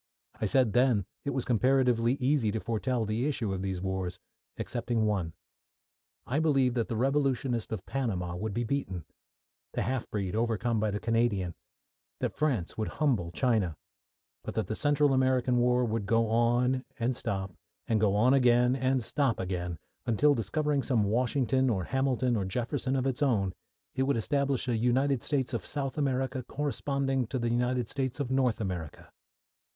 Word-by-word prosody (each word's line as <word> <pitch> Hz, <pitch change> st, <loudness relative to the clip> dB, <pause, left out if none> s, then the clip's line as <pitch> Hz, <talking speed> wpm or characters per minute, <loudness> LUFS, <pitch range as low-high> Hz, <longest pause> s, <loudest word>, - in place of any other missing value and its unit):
I 110 Hz, -, 0 dB
said 125 Hz, -1 st, +3 dB
then 120 Hz, -6 st, +3 dB, 0.2 s
it -, -, 0 dB
was 135 Hz, -3 st, -2 dB
comparatively 125 Hz, -1 st, +3 dB
easy 130 Hz, -4 st, +1 dB
to 110 Hz, -, -1 dB
foretell 115 Hz, +1 st, -1 dB
the 110 Hz, +6 st, -1 dB
issue 115 Hz, -9 st, -1 dB
of 95 Hz, -, -3 dB
these 95 Hz, -1 st, -3 dB
wars 95 Hz, -2 st, -2 dB, 0.4 s
excepting 120 Hz, -2 st, -1 dB
one. 95 Hz, -6 st, -1 dB, 0.9 s
I 140 Hz, +4 st, 0 dB
believed 135 Hz, -6 st, +3 dB
that 120 Hz, -2 st, 0 dB
the 115 Hz, -, -3 dB
Revolutionist 130 Hz, -2 st, 0 dB
of 105 Hz, -5 st, -4 dB
Panama 95 Hz, -10 st, -2 dB
would 105 Hz, +4 st, -3 dB
be 120 Hz, -, 0 dB
beaten; 110 Hz, -, -3 dB, 0.7 s
the -, -, -1 dB
half 130 Hz, -2 st, -2 dB
breed 100 Hz, -2 st, -2 dB
overcome 115 Hz, 0 st, 0 dB
by 110 Hz, 0 st, +1 dB
the 105 Hz, 0 st, -2 dB
Canadian; 115 Hz, -6 st, 0 dB, 0.7 s
that -, -, -2 dB
France 130 Hz, -, 0 dB
would 110 Hz, -, 0 dB
humble 120 Hz, -, +1 dB
China, 100 Hz, -, +1 dB, 0.7 s
but -, -, -6 dB
that 110 Hz, -, 0 dB
the 110 Hz, -, -3 dB
Central 145 Hz, 0 st, +3 dB
American 130 Hz, -1 st, +2 dB
war 125 Hz, 0 st, +3 dB
would 110 Hz, -3 st, -2 dB
go 115 Hz, 0 st, +2 dB
on, 120 Hz, +3 st, +2 dB
and 120 Hz, +1 st, 0 dB
stop, 95 Hz, -4 st, -3 dB, 0.3 s
and 110 Hz, -2 st, +1 dB
go 100 Hz, -2 st, +3 dB
on 120 Hz, +5 st, +4 dB
again, 125 Hz, -1 st, +4 dB
and 130 Hz, -1 st, +1 dB
stop 135 Hz, -1 st, 0 dB
again, 90 Hz, -2 st, -3 dB, 0.3 s
until, 145 Hz, +6 st, +4 dB
discovering 145 Hz, +5 st, 0 dB
some 120 Hz, -3 st, +1 dB
Washington 130 Hz, +4 st, +1 dB
or 95 Hz, -6 st, 0 dB
Hamilton 130 Hz, +1 st, +1 dB
or 105 Hz, -, 0 dB
Jefferson 125 Hz, +7 st, -2 dB
of 130 Hz, -1 st, 0 dB
its 135 Hz, +1 st, -1 dB
own, 105 Hz, -10 st, +2 dB, 0.4 s
it 130 Hz, -, -1 dB
would 135 Hz, -1 st, +2 dB
establish 140 Hz, +2 st, 0 dB
a 120 Hz, -, +1 dB
United 125 Hz, +3 st, +2 dB
States 135 Hz, -3 st, -1 dB
of 115 Hz, -, -2 dB
South 135 Hz, -2 st, -3 dB
America 130 Hz, -3 st, -1 dB
corresponding 135 Hz, -1 st, -1 dB
with 130 Hz, -, -1 dB
the 120 Hz, -, +1 dB
United 125 Hz, 0 st, 0 dB
States 130 Hz, +1 st, -3 dB
of 135 Hz, -3 st, -2 dB
North 130 Hz, -4 st, +2 dB
America. 90 Hz, -7 st, -5 dB
120 Hz, 170 wpm, -29 LUFS, 110-135 Hz, 0.9 s, on